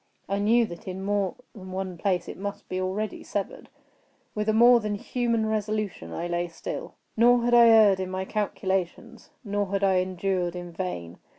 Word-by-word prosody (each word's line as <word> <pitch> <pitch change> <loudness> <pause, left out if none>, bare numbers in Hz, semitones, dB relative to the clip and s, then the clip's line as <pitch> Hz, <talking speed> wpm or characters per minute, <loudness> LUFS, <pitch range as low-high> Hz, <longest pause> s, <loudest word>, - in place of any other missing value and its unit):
I 200 +1 -1
knew 230 +3 +4
that 170 -3 -10
in 190 +1 -5
more 200 -2 0 0.2
than 190 -3 -10
one 185 -1 -4
place 180 0 -1
it - - -6
must 200 +1 -6
be 185 0 -3
already 195 +3 -3
severed. 200 -2 -5 0.6
With 210 0 -1
a - - +5
more 240 +2 +7
than 210 -2 -2
human 230 +1 -1
resolution 215 - -2
I 170 - -4
lay 175 0 -1
still. 165 - -7 0.2
Nor 240 +1 +5
had 240 0 +1
I 235 -1 +8
erred 215 -4 +6
in 185 -1 -3
my 190 0 -3
calculations—nor 200 +1 -3
had 200 +1 -2
I 190 -1 +4
endured 185 -1 -1
in 175 -1 -7
vain. 165 - -5
195 Hz, 180 wpm, -26 LUFS, 185-215 Hz, 0.6 s, I